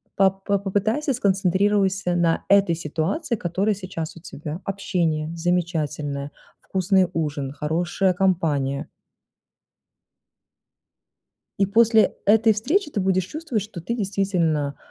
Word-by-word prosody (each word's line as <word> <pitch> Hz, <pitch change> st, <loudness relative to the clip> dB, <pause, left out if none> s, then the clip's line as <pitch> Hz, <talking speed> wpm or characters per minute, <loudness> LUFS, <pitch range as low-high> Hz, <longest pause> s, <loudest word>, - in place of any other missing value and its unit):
по 195 Hz, 0 st, +5 dB
по 195 Hz, +1 st, -2 dB
попытайся, 215 Hz, +9 st, 0 dB
сконцентрируйся 195 Hz, -3 st, +1 dB
на 170 Hz, -1 st, +1 dB
этой 200 Hz, -4 st, +4 dB
ситуации, 170 Hz, -, -2 dB
которая 195 Hz, +2 st, 0 dB
сейчас 185 Hz, -4 st, -6 dB
у -, -, -11 dB
тебя. 155 Hz, +1 st, -7 dB
Общение 170 Hz, -5 st, -1 dB
замечательное, 155 Hz, -5 st, -2 dB, 0.3 s
вкусный 190 Hz, -1 st, +2 dB
ужин, 145 Hz, -4 st, -2 dB
хорошая 175 Hz, +6 st, 0 dB
компания. 160 Hz, -8 st, 0 dB, 2.7 s
И 195 Hz, -, +4 dB
после 225 Hz, +2 st, +4 dB
этой 220 Hz, +1 st, +5 dB
встречи 295 Hz, -, 0 dB
ты 210 Hz, -, -2 dB
будешь 185 Hz, -1 st, +1 dB
чувствовать, 300 Hz, -, -3 dB
что 205 Hz, -4 st, -9 dB
ты 230 Hz, +8 st, -2 dB
действительно, 180 Hz, -, 0 dB
185 Hz, 110 wpm, -23 LUFS, 165-200 Hz, 2.7 s, по